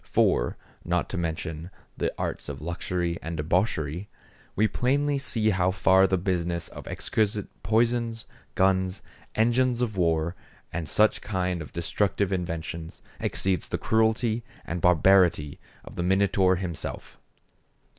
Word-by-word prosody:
For, - - +2 0.3
not 90 0 0
to 95 - -4
mention 80 0 -4 0.3
the - - -1
arts - - -3
of 70 -1 -5
luxury 85 +2 -2
and 80 0 -5
debauchery, 80 +1 0 0.5
we 110 +2 +3
plainly 140 +5 +1
see 110 -5 +1
how 95 -2 +2
far 95 +1 +4
the 95 - +1
business 85 -2 -1
of - - -10
exquisite 105 -2 -1
poisons, 115 +2 +1 0.3
guns, 95 0 +2 0.3
engines 120 +2 +2
of 115 -5 -1
war, 85 -1 +1 0.4
and 80 -3 -3
such 110 0 +3
kind 90 -3 -1
of 75 - -8
destructive 95 +3 0
inventions, 85 -2 -4 0.2
exceeds 95 -1 0
the - - -2
cruelty 110 +1 +1 0.2
and 85 0 -4
barbarity 90 -3 +4 0.3
of - - -11
the - - -1
Minotaur 95 0 +3
himself. 85 -4 -5
95 Hz, 130 wpm, -27 LUFS, 85-110 Hz, 0.5 s, far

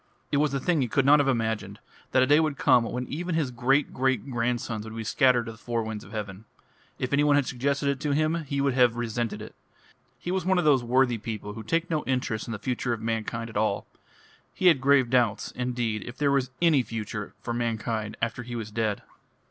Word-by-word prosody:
It 145 - +2
was 150 0 +2
a 140 - -1
thing 165 +2 +1
he 125 - +1
could 130 +4 +1
not 145 +2 +7
have 145 - +2
imagined, 115 -4 -1 0.3
that 130 - +4
a - - +4
day 145 +3 +5
would 155 -3 0
come 125 -5 +4
when 125 +2 -3
even 175 +3 -3
his 150 -6 0
great 130 +4 +1
great 130 0 0
grandsons 120 -2 -1
would 110 0 -8
be 115 - -4
scattered 125 +1 +3
to 115 - -6
the 110 - -14
four 115 -1 -2
winds 110 -1 -5
of - - -14
heaven. 105 -1 -6 0.5
If 130 +1 -3
any 145 +1 +4
one 145 -1 +4
had 145 -2 +3
suggested 140 +3 -1
it 140 -1 0
to 150 - -2
him 155 +3 +1
he 140 0 -1
would 140 -1 +2
have 125 -2 +4
resented 120 -1 -3
it. - - -10 0.6
He 175 - -5
was 190 0 0
one 190 0 +2
of 175 - +1
those 140 -5 +4
worthy 125 -1 +2
people 105 -1 -5
who 110 - -7
take 165 +10 -1
no 155 -2 0
interest 125 -4 -1
in - - -5
the 110 - -3
future 125 +2 -2
of 115 - -4
mankind 115 0 -2
at 110 - -5
all. 105 -1 0 0.7
He 185 - +5
had 150 -7 +3
grave 135 -2 +4
doubts, 120 -5 +1
indeed, 120 -4 -2
if 125 +1 -8
there 145 -1 +2
was 135 -2 +1
any 160 -5 +5
future 110 -2 -5
for 120 - -4
mankind 115 -2 -2
after 115 +1 -1
he 120 0 -7
was 110 -2 -5
dead. 110 -2 -1
125 Hz, 235 wpm, -27 LUFS, 115-140 Hz, 0.7 s, not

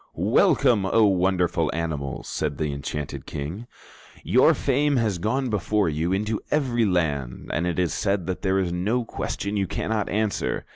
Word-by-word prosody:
"Welcome, 105 -6 +3
O 110 +2 +4
wonderful 90 -4 +2
animals," 75 -5 -3
said 75 -2 -2
the 75 -2 -1
enchanted 70 +1 -5
King. 85 +12 -5 0.6
"Your - - +4
fame 145 +2 +1
has 110 -7 0
gone 120 +6 -1
before 105 -2 +1
you 80 +3 -1
into 105 +3 -1
every 125 -6 +1
land, 75 - -1
and 85 +2 0
it 85 - -2
is 90 -3 +1
said 100 -3 0
that 95 0 -3
there 95 -1 +1
is 95 -3 0
no 110 +8 0
question 100 -2 -3
you 100 -1 0
cannot 110 +3 -2
answer. 110 -1 -1
95 Hz, 160 wpm, -24 LUFS, 85-110 Hz, 0.6 s, O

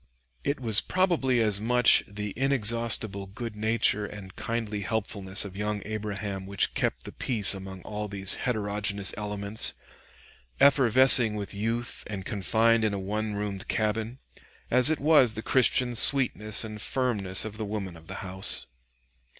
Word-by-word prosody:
It 140 0 -2
was 110 -4 +2
probably 165 -10 0
as 105 -2 +3
much 125 +2 +5
the 105 0 -6
inexhaustible 115 -6 +1
good 110 +3 -7
nature 110 -1 +1
and 95 -3 -11
kindly 110 -3 -4
helpfulness 100 -2 -1
of 95 -2 -9
young 105 0 -3
Abraham 100 -2 -5
which 100 0 -1
kept - - -2
the - - -9
peace 110 -6 0
among 95 -1 -9
all 105 0 -5
these 95 -1 +2
heterogeneous 105 -3 -2
elements, 105 0 -1 0.9
effervescing 130 -4 +6
with 100 -1 -6
youth 115 +4 -3
and 100 -3 -7
confined 110 +3 +1
in 105 -2 0
a - - -4
one 105 +2 -4
roomed 100 -1 -5
cabin, 110 +2 -2 0.5
as 125 +3 +5
it 160 - -1
was 140 -6 +4
the 110 - -6
Christian 125 -1 +2
sweetness 115 -4 +4
and 105 -1 -8
firmness 105 -9 -2
of 110 -1 -7
the - - -3
woman 100 -4 -5
of 80 0 -16
the - - -7
house. 95 +1 -2
105 Hz, 150 wpm, -26 LUFS, 100-115 Hz, 0.9 s, effervescing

